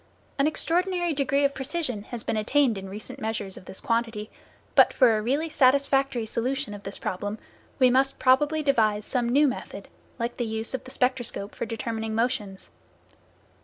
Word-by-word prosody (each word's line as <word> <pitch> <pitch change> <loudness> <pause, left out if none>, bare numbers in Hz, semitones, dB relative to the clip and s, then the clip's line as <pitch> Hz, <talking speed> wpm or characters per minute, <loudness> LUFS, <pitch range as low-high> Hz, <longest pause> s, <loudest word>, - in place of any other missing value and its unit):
An 275 - +4
extraordinary 350 +2 0
degree 275 0 +1
of 280 - +1
precision 265 -5 -2
has 240 -3 -6
been - - -1
attained 240 +3 +2
in 195 -1 -7
recent 215 +7 -8
measures 215 -4 -3
of - - -12
this 190 - -5
quantity, 230 -2 -1 0.4
but - - +6
for 245 -4 +5
a 215 - 0
really 280 +8 0
satisfactory 270 -3 +3
solution 250 +2 -2
of 205 - -8
this 195 0 -6
problem, 205 +3 -3 0.4
we 255 -2 +5
must 265 +2 +2
probably 295 +4 +3
devise 215 -7 +2
some 245 -3 0
new 285 +4 +5
method, 255 - -5 0.3
like 235 0 -3
the 240 - -1
use 220 +2 -3
of 260 - -4
the - - -9
spectroscope 245 -6 0
for - - -4
determining 225 0 -3
motions. 220 -5 -2
245 Hz, 170 wpm, -26 LUFS, 220-275 Hz, 0.4 s, but